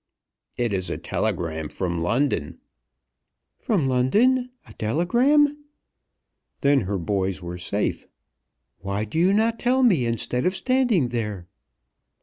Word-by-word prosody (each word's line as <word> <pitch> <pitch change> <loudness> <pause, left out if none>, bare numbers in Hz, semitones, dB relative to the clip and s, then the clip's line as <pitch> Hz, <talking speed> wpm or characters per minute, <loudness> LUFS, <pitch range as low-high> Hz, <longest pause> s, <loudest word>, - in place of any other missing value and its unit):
"It 120 -3 0
is 95 -1 -1
a - - -3
telegram 80 -2 -3
from 85 -3 -3
London." 85 - 0 1.0
From 185 - 0
London 220 - +2 0.2
a 110 - -13
telegram! 260 - +2 1.0
Then 140 0 +4
her 100 - 0
boys 95 0 -2
were 90 0 -6
safe. 100 +4 -2 0.7
"Why 100 +3 -3
do 110 +10 -3
you 180 +3 +4
not 225 +3 +1
tell 255 +2 +2
me 170 - +3
instead 120 +3 -1
of 185 - 0
standing 245 - +2
there?" 105 -6 -4
125 Hz, 125 wpm, -24 LUFS, -, 1.0 s, Then